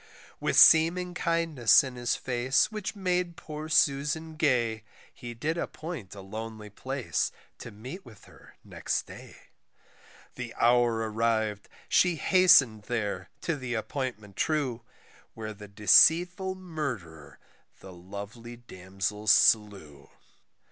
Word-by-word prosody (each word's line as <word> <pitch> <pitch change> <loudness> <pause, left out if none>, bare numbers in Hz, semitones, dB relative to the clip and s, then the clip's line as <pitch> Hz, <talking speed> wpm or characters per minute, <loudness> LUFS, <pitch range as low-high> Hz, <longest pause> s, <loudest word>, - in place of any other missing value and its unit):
With - - -1
seeming 175 +3 +6
kindness 165 -8 +3
in 130 -2 -7
his 120 -1 -1
face 130 - 0
which 215 -1 -5
made 180 -3 -2
poor 155 0 -8
Susan 155 +1 +1
gay, 120 -8 0 0.3
He 120 -1 -9
did 155 +8 -2
appoint 155 - -7
a 100 - -9
lonely 110 +1 -8
place 130 +4 -3 0.3
to - - -8
meet 125 - -10
with 110 - -16
her - - -19
next - - -3
day. - - -13 1.0
The 120 -2 -8
hour 120 -2 +2
arriv'd, 110 -2 -1 0.2
she 180 -2 +3
hasten'd 150 - +4
there 100 -5 -3
to 165 - -2
the 130 -4 -5
appointment 110 -4 -5
true, 140 -7 -1 0.5
Where 110 -1 -6
the 105 0 -12
deceitful 175 - +4
murderer 125 - -7 0.4
the 95 - -12
lovely 100 +6 -9
damsel 100 -1 -6
slew. 100 -9 +2
120 Hz, 120 wpm, -28 LUFS, 105-160 Hz, 1.0 s, seeming